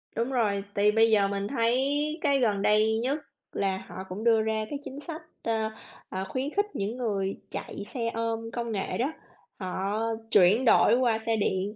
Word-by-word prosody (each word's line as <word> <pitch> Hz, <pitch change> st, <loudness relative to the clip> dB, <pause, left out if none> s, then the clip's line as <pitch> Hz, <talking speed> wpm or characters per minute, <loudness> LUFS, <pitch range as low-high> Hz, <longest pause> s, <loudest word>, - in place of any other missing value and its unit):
Đúng 235 Hz, +4 st, -1 dB
rồi, 205 Hz, -5 st, +1 dB
thì 205 Hz, +1 st, +4 dB
bây 225 Hz, +1 st, +4 dB
giờ 200 Hz, -2 st, +4 dB
mình 200 Hz, 0 st, -2 dB
thấy 245 Hz, +1 st, +1 dB, 0.4 s
cái 280 Hz, -3 st, +3 dB
gần 210 Hz, -5 st, +2 dB
đây 215 Hz, +1 st, +3 dB
nhất 280 Hz, +4 st, 0 dB, 0.3 s
là 195 Hz, -1 st, 0 dB
họ -, -, -11 dB
cũng 200 Hz, +4 st, -5 dB
đưa 225 Hz, -2 st, +5 dB
ra 220 Hz, 0 st, -1 dB
cái 285 Hz, -, -4 dB
chính 275 Hz, +2 st, -7 dB
sách, 320 Hz, +1 st, -6 dB, 0.2 s
ơ, 220 Hz, -1 st, 0 dB, 0.4 s
ờ, 190 Hz, +1 st, -3 dB
khuyến 265 Hz, +2 st, -2 dB
khích 410 Hz, +1 st, +3 dB
những 210 Hz, +5 st, -2 dB
người 200 Hz, -5 st, -1 dB
chạy 200 Hz, 0 st, -5 dB
xe 230 Hz, -1 st, -2 dB
ôm 225 Hz, 0 st, -2 dB
công 235 Hz, -1 st, -3 dB
nghệ 195 Hz, -3 st, -2 dB
đó. 265 Hz, +6 st, 0 dB, 0.5 s
Họ 195 Hz, +3 st, -2 dB, 0.3 s
chuyển 205 Hz, +6 st, +5 dB
đổi 235 Hz, -, +6 dB
qua 235 Hz, -3 st, +2 dB
xe 225 Hz, 0 st, 0 dB
điện 200 Hz, +1 st, -1 dB
220 Hz, 190 wpm, -28 LUFS, 200-240 Hz, 0.5 s, đổi